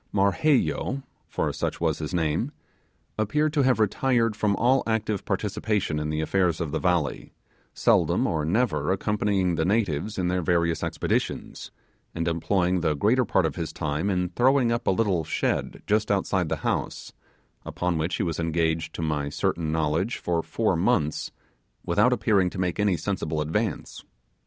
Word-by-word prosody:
Marheyo 130 +6 +1 0.2
for - - -2
such - - -3
was 80 -2 0
his 75 - -4
name 85 - 0 0.7
appeared 150 +8 +1
to 150 - +2
have 130 -3 +3
retired 115 +1 +2
from 105 -2 +1
all 130 +4 +3
active 110 -3 -1
participation 100 -4 -1
in 75 0 -3
the 75 0 -1
affairs 90 0 +1
of 80 -4 -3
the - - -1
valley, 85 -7 -1 0.4
seldom - - +3
or 80 -2 0
never 105 +4 +1
accompanying 100 -2 0
the 80 - 0
natives 100 0 0
in 90 -2 0
their 90 0 0
various 85 -1 +1
expeditions; - - -2 0.5
and 85 0 -2
employing 90 +2 +1
the 80 -3 +1
greater 120 - +2
part 95 -4 +2
of 80 - -3
his 85 -2 -3
time 75 +4 -2
in 90 -2 0
throwing 125 +4 +3
up 115 - -2
a - - +5
little 95 -4 +1
shed - - -2
just 105 +1 +1
outside 95 -3 0
the 80 - 0
house, - - -2 0.5
upon 90 -2 -2
which 80 +3 -1
he - - -1
was 85 -2 -2
engaged 80 -1 -1
to 80 - -3
my 75 -2 -1
certain 80 +2 -1
knowledge 80 +8 0
for 85 -1 -1
four - - 0
months, 75 0 0 0.5
without - - +3
appearing 95 -4 +2
to - - -9
make 90 0 -1
any 100 -4 +2
sensible 80 -3 -2
advance. 80 +5 -2
90 Hz, 165 wpm, -25 LUFS, 80-105 Hz, 0.7 s, a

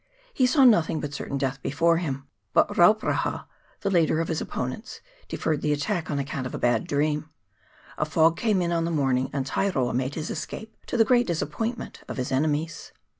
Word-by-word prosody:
He 255 - +3
saw 270 +2 +4
nothing 170 -10 +5
but 145 -1 -5
certain 140 0 -4
death 135 0 -2
before 165 +4 +2
him; 140 -6 -3 0.3
but - - +4
Rauparaha, - - +3 0.4
the 200 - 0
leader 165 -3 +3
of 165 - -1
his 160 - -1
opponents, 130 - -5 0.3
deferred 155 -2 -1
the 150 - +1
attack 160 +3 -2
on 145 - -1
account 140 -2 -3
of - - -6
a - - -3
bad 120 -2 +1
dream; 150 +1 0 0.7
a 150 - +2
fog 160 +1 +3
came 210 -4 +1
on 170 - -1
in 165 -1 +1
the - - -1
morning, 135 -5 +1
and 135 -2 -2
Tairoa 135 -5 0
made 130 +3 -1
his 160 0 -4
escape, 220 0 -6
to - - -2
the 225 - +5
great 245 0 +3
disappointment 225 +7 -3
of - - -6
his 130 -1 -3
enemies. 150 +4 -1
155 Hz, 195 wpm, -26 LUFS, 140-175 Hz, 0.7 s, nothing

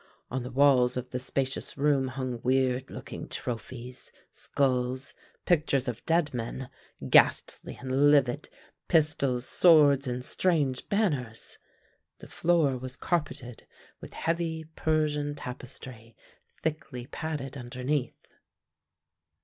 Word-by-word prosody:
On 130 +1 -1
the 125 - -6
walls 130 -2 +4
of 125 0 -5
the 125 - -2
spacious 130 +1 -2
room 140 -2 +2
hung 130 -2 -4
weird 130 0 +1
looking - - -7
trophies, 125 +1 -5 0.2
skulls, 130 -1 -1 0.3
pictures 145 -6 +2
of 120 -2 -4
dead 165 -3 +2
men, 125 +2 -5 0.4
ghastly - - +3
and 135 +2 +3
livid, 140 -1 +3 0.4
pistols, 140 -6 +2
swords, 145 -5 +5
and 125 0 -3
strange 150 -8 0
banners. 145 - -1 0.6
The - - -12
floor 160 -7 +2
was 130 +1 -7
carpeted 145 -8 -3 0.3
with - - -11
heavy 165 -1 -1
Persian 150 -2 0
tapestry, 125 -4 -8 0.5
thickly 145 -6 -3
padded 145 -2 -5
underneath. 125 +1 -3
135 Hz, 110 wpm, -28 LUFS, 125-150 Hz, 0.6 s, swords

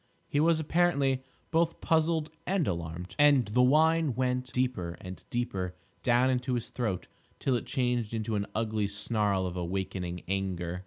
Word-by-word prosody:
He 145 - 0
was, 165 +1 +4
apparently, 145 -5 +2 0.3
both 165 0 +2
puzzled 160 -1 +1 0.2
and 185 -5 +1
alarmed, 85 0 -4
and 145 -4 +6
the 125 +4 +3
whine 155 +1 +4
went 125 0 -1
deeper 120 -10 -1
and 95 0 -8
deeper 95 -7 -2 0.3
down 125 +2 +3
into 125 0 0
his 120 -1 -3
throat 105 -8 -2 0.3
till 130 - +1
it 120 - -3
changed 125 -4 0
into 110 -1 -2
an 100 0 -1
ugly 110 -2 0
snarl 105 -2 0
of 90 -1 -4
awakening 90 -1 -3
anger. 90 -2 -2
120 Hz, 155 wpm, -30 LUFS, 95-140 Hz, 0.3 s, and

